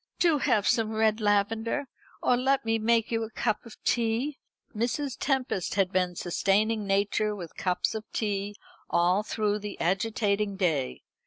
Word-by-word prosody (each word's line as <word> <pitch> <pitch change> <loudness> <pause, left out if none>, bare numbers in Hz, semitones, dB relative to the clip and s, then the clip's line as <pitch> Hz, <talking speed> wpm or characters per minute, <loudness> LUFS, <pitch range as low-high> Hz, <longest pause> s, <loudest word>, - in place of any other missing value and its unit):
"Do 330 -4 +3
have 210 -6 +2
some 225 -1 +2
red 220 0 +2
lavender. 220 +6 +1 0.4
Or 250 - +4
let 265 +1 +1
me 225 0 +1
make 230 +1 +2
you 225 -1 +1
a 220 - -3
cup 220 +1 -2
of 225 - -12
tea." 240 +5 0 0.4
Mrs. 250 +5 -1
Tempest 265 - -1
had 195 -2 +2
been 180 -1 0
sustaining 205 +5 +1
nature 205 +2 +1
with 175 -5 -8
cups 180 -1 0
of 220 0 -5
tea 205 -1 -2 0.3
all 175 +3 +3
through 210 -1 -1
the 205 -1 -7
agitating 200 +2 0
day. 160 -9 -1
215 Hz, 155 wpm, -28 LUFS, 195-230 Hz, 0.4 s, Or